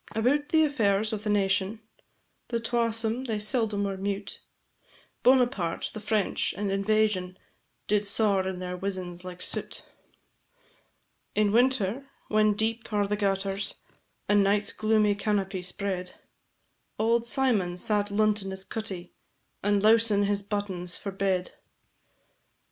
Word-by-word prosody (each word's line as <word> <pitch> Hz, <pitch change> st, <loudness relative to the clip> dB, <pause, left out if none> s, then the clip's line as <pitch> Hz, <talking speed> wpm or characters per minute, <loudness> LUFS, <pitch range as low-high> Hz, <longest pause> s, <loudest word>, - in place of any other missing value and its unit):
About 265 Hz, +7 st, +1 dB
the 315 Hz, -1 st, +4 dB
affairs 220 Hz, -6 st, +1 dB
o' -, -, 0 dB
the 210 Hz, +1 st, -5 dB
nation, 200 Hz, +1 st, +1 dB, 0.7 s
The 235 Hz, -, -1 dB
twasome 230 Hz, +1 st, 0 dB
they 220 Hz, -2 st, -1 dB
seldom 210 Hz, -1 st, +1 dB
were 195 Hz, -1 st, -2 dB
mute; 200 Hz, +1 st, -4 dB, 0.8 s
Bonaparte, 245 Hz, -9 st, +2 dB
the 215 Hz, -, -6 dB
French, 215 Hz, -2 st, 0 dB
and 200 Hz, -1 st, -1 dB
invasion, 195 Hz, -2 st, +1 dB, 0.5 s
Did 210 Hz, -1 st, +1 dB
saur 200 Hz, -3 st, +3 dB
in 190 Hz, -1 st, -3 dB
their 180 Hz, 0 st, -4 dB
wizens 180 Hz, -2 st, -4 dB
like 180 Hz, -1 st, -7 dB
soot. -, -, -4 dB, 1.5 s
In 210 Hz, -1 st, +3 dB
winter, 250 Hz, +1 st, +2 dB, 0.2 s
when 215 Hz, -1 st, +3 dB
deep 225 Hz, +2 st, -2 dB
are 205 Hz, -1 st, +1 dB
the 210 Hz, -, 0 dB
gutters, 195 Hz, -1 st, -1 dB, 0.5 s
And 205 Hz, -1 st, +4 dB
night's 205 Hz, +1 st, +1 dB
gloomy 215 Hz, -1 st, +2 dB
canopy 200 Hz, -2 st, -1 dB
spread, 180 Hz, 0 st, -3 dB, 0.8 s
Auld 230 Hz, +1 st, +2 dB
Symon 225 Hz, -9 st, +1 dB
sat 205 Hz, +1 st, 0 dB
luntin' 210 Hz, -1 st, +1 dB
his 190 Hz, 0 st, -5 dB
cuttie, 190 Hz, -6 st, -5 dB, 0.5 s
And 205 Hz, 0 st, +1 dB
lowsin' 220 Hz, -2 st, +4 dB
his 200 Hz, 0 st, +1 dB
buttons 195 Hz, -4 st, -3 dB
for 200 Hz, -, -5 dB
bed. 190 Hz, -2 st, -1 dB
205 Hz, 125 wpm, -27 LUFS, 195-220 Hz, 1.5 s, the